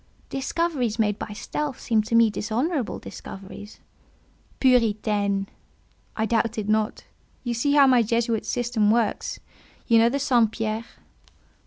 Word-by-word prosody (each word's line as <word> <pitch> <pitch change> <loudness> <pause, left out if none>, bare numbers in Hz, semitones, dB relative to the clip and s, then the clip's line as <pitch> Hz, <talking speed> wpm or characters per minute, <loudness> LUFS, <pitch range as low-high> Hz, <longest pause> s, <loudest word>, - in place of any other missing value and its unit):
"Discoveries 270 -4 -1
made 210 -2 +1
by 210 - -6
stealth 290 +5 -4
seem 225 -3 +1
to 230 - +1
me 230 -1 +5
dishonourable 245 - -2
discoveries." 195 +2 -10 0.8
"Puritaine! 210 -5 +2 0.7
I 220 - +1
doubt 225 0 0
it 210 -2 -3
not. 215 0 0 0.4
Yet 240 -2 -2
see 285 +4 +1
how 285 -1 +7
my 255 -2 +5
Jesuit's 230 0 0
system 240 -4 +1
works. 230 -1 0 0.5
You 230 -2 +5
know 230 +1 +5
the 275 - -1
St. 245 -5 +3
Pierre?" 225 0 -3
230 Hz, 135 wpm, -24 LUFS, 215-250 Hz, 0.8 s, how